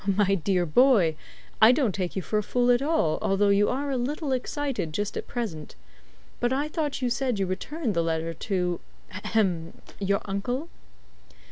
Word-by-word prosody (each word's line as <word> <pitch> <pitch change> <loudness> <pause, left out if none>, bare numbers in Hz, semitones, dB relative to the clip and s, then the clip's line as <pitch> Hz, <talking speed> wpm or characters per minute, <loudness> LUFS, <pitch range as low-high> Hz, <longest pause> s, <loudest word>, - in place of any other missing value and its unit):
"My 200 -2 +3
dear 180 0 +1
boy, 190 - +4 0.5
I 220 +2 +9
don't 255 -6 +1
take 180 -2 -3
you 190 - -2
for 215 - 0
a - - 0
fool 245 +3 +2
at 245 +1 +3
all, 280 - +1
although 200 +1 +2
you 200 +1 +4
are 280 +2 -1
a 265 - 0
little 285 +4 -2
excited 260 - -2
just 205 +4 -2
at - - -4
present. 190 -12 -5 0.6
But 240 - +1
I 285 +3 0
thought 300 -4 -2
you 245 - +1
said 250 -1 0
you 195 - +1
returned 235 - -3
the 170 - +1
letter 165 0 -1
to 180 0 -1 0.3
ahem 175 -7 -1 0.3
your 200 0 +1
uncle." 245 +11 -3
210 Hz, 175 wpm, -26 LUFS, 185-260 Hz, 0.6 s, I